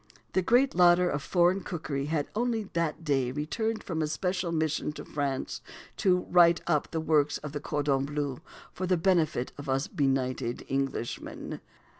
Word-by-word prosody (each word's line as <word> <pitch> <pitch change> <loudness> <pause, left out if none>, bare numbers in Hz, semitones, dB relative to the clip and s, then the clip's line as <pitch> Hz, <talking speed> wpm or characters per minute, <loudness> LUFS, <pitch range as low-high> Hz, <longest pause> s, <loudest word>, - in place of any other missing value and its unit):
The 190 - +3
great 245 +8 +3
lauder 180 0 +5
of 145 - -2
foreign 175 +4 +2
cookery 150 -7 -3
had 150 -2 -1
only 230 -1 0
that 170 -1 -1
day 135 -5 +1
returned 215 - -2
from 160 -3 -3
a 155 - +1
special 180 +2 -1
mission 155 -2 0
to - - -8
France, 140 -3 -3 0.4
to 180 -1 +2
"write 170 -1 +6
up" 150 -4 +1
the 160 - -2
works 150 -2 +2
of 150 - -7
the 145 - -4
cordon 140 -2 0
bleu 145 -1 -3 0.3
for 185 - -3
the 185 -1 +3
benefit 165 -7 +1
of 145 -1 -6
us 135 +1 +1
benighted 130 -4 -1
Englishmen. 135 -3 -3
155 Hz, 165 wpm, -29 LUFS, 140-180 Hz, 0.4 s, write